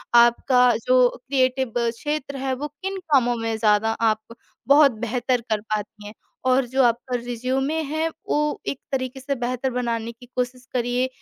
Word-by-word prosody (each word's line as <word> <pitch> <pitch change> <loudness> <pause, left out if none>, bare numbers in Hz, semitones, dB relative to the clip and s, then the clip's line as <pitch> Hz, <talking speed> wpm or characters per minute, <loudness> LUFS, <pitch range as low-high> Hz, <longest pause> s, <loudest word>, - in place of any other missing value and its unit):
आपका 240 +2 +5 0.2
जो 255 0 +5
क्रिएटिव 260 -2 0
क्षेत्र 275 +5 -2
है, 265 0 -1
वो 290 +3 -4
किन 380 +7 -6 0.2
कामों 245 -3 +4
में 225 0 -2
ज़्यादा 215 0 +3 0.2
आप 215 +1 -4 0.3
बहुत 285 0 +7
बेहतर 245 +1 0
कर 215 -1 0
पाती 210 0 -5
हैं 210 - -9 0.4
और 255 0 +3
जो 265 +2 +2
आपका 245 +1 +1
रिज़्यूमे 255 +6 -1
है, 315 +2 -1 0.2
वो 300 0 0
एक 275 - -2
तरीके 260 0 -2
से 275 +1 -2
बेहतर 250 +1 -2
बनाने 235 -2 -2
की 235 +2 -16
कोशिश 250 0 -3
करिए 245 +1 0
250 Hz, 160 wpm, -23 LUFS, 235-270 Hz, 0.4 s, बहुत